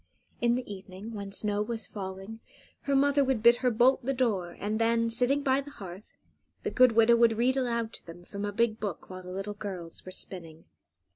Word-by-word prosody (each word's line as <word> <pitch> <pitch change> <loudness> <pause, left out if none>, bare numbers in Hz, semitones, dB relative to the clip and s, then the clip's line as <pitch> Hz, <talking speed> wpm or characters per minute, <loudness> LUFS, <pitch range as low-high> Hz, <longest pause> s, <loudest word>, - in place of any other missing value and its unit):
In 235 0 +3
the 250 0 -3
evening, 190 +3 -9
when 200 -2 -6
snow 205 0 0
was 225 -1 -4
falling, 195 +3 -7 0.5
her 280 - +1
mother 285 +1 +4
would 260 -4 0
bid 235 0 +7
her 250 0 +2
bolt 245 +3 +3
the 270 +2 -1
door, 200 -9 0
and 215 +2 -2
then, 230 0 +2
sitting 255 +5 +2
by 270 0 +2
the 285 - -10
hearth, 195 -6 -11 0.5
the - - -2
good 255 -2 +5
widow 230 +1 +6
would 230 -1 +4
read 250 +3 +2
aloud 235 -3 -1
to - - -10
them 170 +1 -10
from 200 +2 -6
a 205 - -1
big 220 +1 +1
book 200 -3 -5
while 185 0 -7
the 180 - -10
little 195 +3 -4
girls 185 -5 -6
were 185 - -9
spinning. 165 -4 -6
225 Hz, 210 wpm, -29 LUFS, 195-245 Hz, 0.5 s, bid